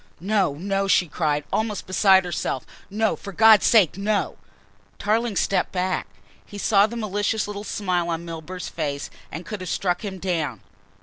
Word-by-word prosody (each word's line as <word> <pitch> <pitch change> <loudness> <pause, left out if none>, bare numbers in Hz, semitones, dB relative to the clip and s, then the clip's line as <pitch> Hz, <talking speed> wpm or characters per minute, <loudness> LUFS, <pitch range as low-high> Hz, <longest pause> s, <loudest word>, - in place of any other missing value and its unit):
"No, 190 -5 +1
no!" 195 +4 -1
she 180 -2 +3
cried, 150 -2 -1
almost 215 -2 -1
beside 190 0 +4
herself, 160 -6 -3 0.2
"no, 220 +2 0
for 200 - -9
God's 220 +2 +6
sake, 195 -5 +4
no!" 200 -2 0 0.6
Tarling 220 +1 0
stepped 195 - +1
back. 185 - -1 0.4
He 205 - -11
saw 205 0 +4
the 235 - -8
malicious 210 0 -1
little 205 0 -6
smile 180 -5 -1
on 165 0 -3
Milburgh's 170 +2 -6
face 145 -3 -4 0.2
and 165 +4 -7
could 210 0 -6
have 185 - -5
struck 180 0 -1
him 195 -2 -5
down. 160 - -2
190 Hz, 165 wpm, -23 LUFS, 170-210 Hz, 0.6 s, God's